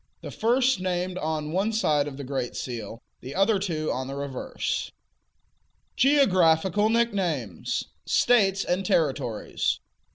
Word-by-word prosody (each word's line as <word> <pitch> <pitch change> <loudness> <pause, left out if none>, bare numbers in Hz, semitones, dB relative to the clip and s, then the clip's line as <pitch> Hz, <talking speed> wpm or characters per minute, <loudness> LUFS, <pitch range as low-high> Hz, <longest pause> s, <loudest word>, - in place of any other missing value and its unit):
The - - -6
first 250 0 +2
named 185 0 -2
on 155 -1 -2
one 195 +6 +1
side 150 -10 +1
of 135 -2 -7
the 140 - -6
great 130 -2 -3
seal, 115 -2 -6 0.2
the 130 +3 -8
other 195 +2 +3
two 160 -5 -2
on 130 +1 -3
the 135 - -5
reverse. 140 -2 -3 1.0
GEOGRAPHICAL 200 - +4
NICKNAMES. 185 - -1 0.2
States 195 -5 +3
and 180 +2 0
Territories. 135 - 0
175 Hz, 125 wpm, -26 LUFS, 140-200 Hz, 1.0 s, GEOGRAPHICAL